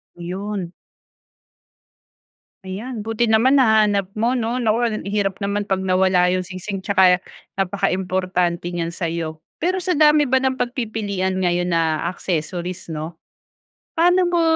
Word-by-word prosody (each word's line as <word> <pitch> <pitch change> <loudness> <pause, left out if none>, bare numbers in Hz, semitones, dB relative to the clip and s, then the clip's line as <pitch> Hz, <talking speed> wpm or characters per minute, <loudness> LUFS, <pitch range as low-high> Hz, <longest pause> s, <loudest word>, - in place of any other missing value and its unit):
Yun. 185 +1 -5 1.9
Ayan 215 +4 -6
buti 225 +1 0
naman 240 +5 +4
nahanap 215 -6 +3
mo, 235 +3 +2
'no, 240 0 -1
naku 230 -1 +1
hirap 200 -2 -1
naman 200 0 -1
pag 195 -2 -1
nawala 185 -1 +3
'yung 185 0 +1
singsing, 190 +1 -6
'tsaka 185 -2 +4 0.3
napakaimportante 185 -2 -1
niyan 170 -1 -3
sa'yo. 165 -2 -4 0.2
Pero 370 +2 +1
sa 365 0 -1
dami 300 -1 +5
ba 265 +1 +2
ng 260 0 0
pagpipilian 210 -6 -2
ngayon 175 -1 0
na 160 -2 +1
accessories, 175 +1 -4
'no, 160 +2 -5 0.8
paano 355 +3 +3
mo 345 -1 +2
195 Hz, 125 wpm, -21 LUFS, 180-225 Hz, 1.9 s, dami